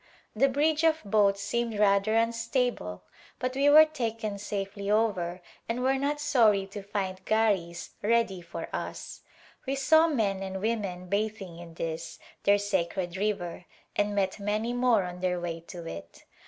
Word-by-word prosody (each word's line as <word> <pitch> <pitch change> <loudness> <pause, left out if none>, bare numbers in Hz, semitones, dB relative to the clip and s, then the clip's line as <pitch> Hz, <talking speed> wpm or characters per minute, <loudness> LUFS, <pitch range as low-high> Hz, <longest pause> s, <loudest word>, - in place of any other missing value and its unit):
The 270 +5 +4
bridge 300 +4 +1
of 320 -1 +3
boats 200 -1 +3
seemed 235 +1 -1
rather 205 +1 +3
unstable 230 - 0 0.3
but 255 0 -2
we 280 +2 +3
were 310 +2 +9
taken 225 -8 -3
safely 200 0 -4
over 185 -5 0 0.3
and 240 +2 -1
were 265 +1 +2
not 290 +2 -1
sorn 225 -9 +3
to 205 +1 -7
find 190 -2 -4
garh 205 -6 +1 0.3
ready 210 -4 +1
for 170 - -7
us. - - -6 0.5
We 270 - 0
saw 315 +4 +5
men 210 -10 0
and 190 0 -4
women 200 -4 -2
bathing 200 -3 -2
in 170 -1 -11
this, 165 -1 -4 0.3
their 200 0 +6
sacred 190 -3 -1
river, 190 -4 -2 0.3
and 205 0 0
met 195 0 0
many 210 +4 -1
more 245 -4 +3
on 180 0 -6
their 180 -1 0
way 170 -1 -4
to 175 -2 -8
it. 85 - -9
205 Hz, 155 wpm, -28 LUFS, 190-235 Hz, 0.5 s, were